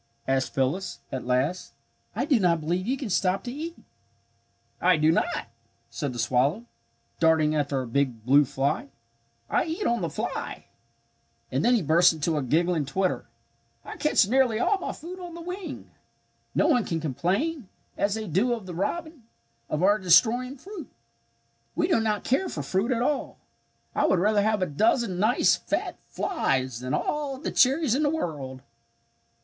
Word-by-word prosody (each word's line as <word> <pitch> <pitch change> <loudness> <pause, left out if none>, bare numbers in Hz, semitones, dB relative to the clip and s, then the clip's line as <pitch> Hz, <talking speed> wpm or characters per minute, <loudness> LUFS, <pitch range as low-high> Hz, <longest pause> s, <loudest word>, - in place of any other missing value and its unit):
asked 135 0 0
Phyllis, 135 +9 -1
at 130 -1 -5
last. 130 +8 0 0.4
"I - - 0
do 270 -7 +3
not 170 -4 +3
believe 175 +5 -2
you 255 - +1
even 265 -6 -4
stop 185 +1 +1
to 245 - -5
eat." 325 +4 -5 1.1
"I 180 -1 +4
do 155 +1 +4
not," 165 - +2 0.6
said 145 -4 -3
the 120 - -7
swallow, 140 - +1 0.5
darting 160 -2 +3
after 140 -3 0
a - - -7
big 120 -3 -1
blue 140 +3 +6
fly. 140 +1 -1 0.6
"I - - +1
eat 335 +5 -3
on 235 0 +1
the - - -1
fly." - - -4 0.9
And - - 0
then 245 +1 +4
he 220 - +1
burst 170 +4 +5
into 160 +1 -1
a 150 - 0
giggling 160 +3 +1
twitter. 185 +5 -1 0.6
"I - - -7
catch 300 -9 +3
nearly 250 -1 +3
all 395 +10 +2
my - - -3
food 355 +4 -9
on 350 -2 -8
the - - -8
wing. 360 +2 -7 0.6
No - - +3
one 245 - +3
can 165 -3 -2
complain 190 - -1 0.3
as 200 +1 0
they 220 0 -4
do 205 +8 +1
of 225 -5 -5
the 180 - -7
robin 310 - -4 0.4
of 155 +3 -1
our 205 +2 +4
destroying 235 +9 +4
fruit. 385 +3 -9 0.9
"We 330 - +1
do 335 - +3
not 215 -2 0
care 320 +10 +1
for - - -4
fruit 195 +7 0
at 240 -1 +1
all. 285 +1 -1 0.6
I - - +2
would 190 - +3
rather 205 +3 +3
have 215 -2 +1
a - - +2
dozen 200 - +1
nice 220 +5 +3
fat - - -3
flies 130 - -1
than 130 +1 -2
all 290 -3 -2
the 265 - -4
cherries 270 0 +3
in 275 - +1
the 295 - +3
world!" 140 - -4
195 Hz, 175 wpm, -26 LUFS, -, 1.1 s, blue